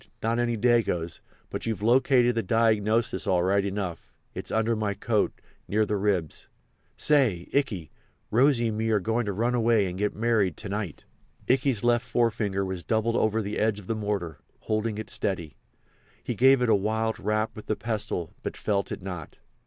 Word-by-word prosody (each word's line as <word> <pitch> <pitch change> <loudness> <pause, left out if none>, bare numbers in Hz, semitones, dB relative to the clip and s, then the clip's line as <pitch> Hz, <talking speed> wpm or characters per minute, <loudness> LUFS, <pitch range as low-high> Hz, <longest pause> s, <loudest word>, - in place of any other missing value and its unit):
"Not 115 +2 +1
any 120 -1 0
Dagoes. 105 -8 +1 0.3
But - - -4
you've 110 -2 -2
located 125 +1 +4
the 115 - 0
diagnosis 110 -1 +1
all 90 -2 +3
right 100 +2 +2
enough—it's 95 -3 -6
under 110 +1 +1
my 105 -2 -1
coat, 110 -1 +1 0.4
near 110 +1 +2
the 105 - -1
ribs. 95 -6 -1 0.5
Say! 125 - +3
Ikey—Rosy 120 - 0
and 110 0 -3
me 115 0 0
are 110 -2 +3
goin' 110 +3 -1
to - - 0
run 115 +5 0
away 115 -3 +3
and 90 0 -5
get 105 0 0
married 110 -5 +1
to 105 - -6
night." 100 -5 -4 0.4
Ikey's 130 -3 +2
left 120 0 +2
forefinger 110 -5 0
was 95 -2 -4
doubled 115 +1 0
over 110 0 +1
the 100 +1 -3
edge 110 -1 +1
of 100 - -12
the 115 - -1
mortar, 100 -6 -3 0.2
holding 110 0 -1
it 110 -1 -5
steady. 85 -8 -2 0.7
He - - -2
gave 130 +3 +5
it 120 - +1
a - - +6
wild 110 +2 0
rap 110 +2 -1
with 110 - -10
the 110 - 0
pestle, 105 -8 -3
but - - -5
felt 100 -2 -1
it 95 - -5
not. 90 -5 -7
110 Hz, 175 wpm, -27 LUFS, 100-115 Hz, 0.7 s, a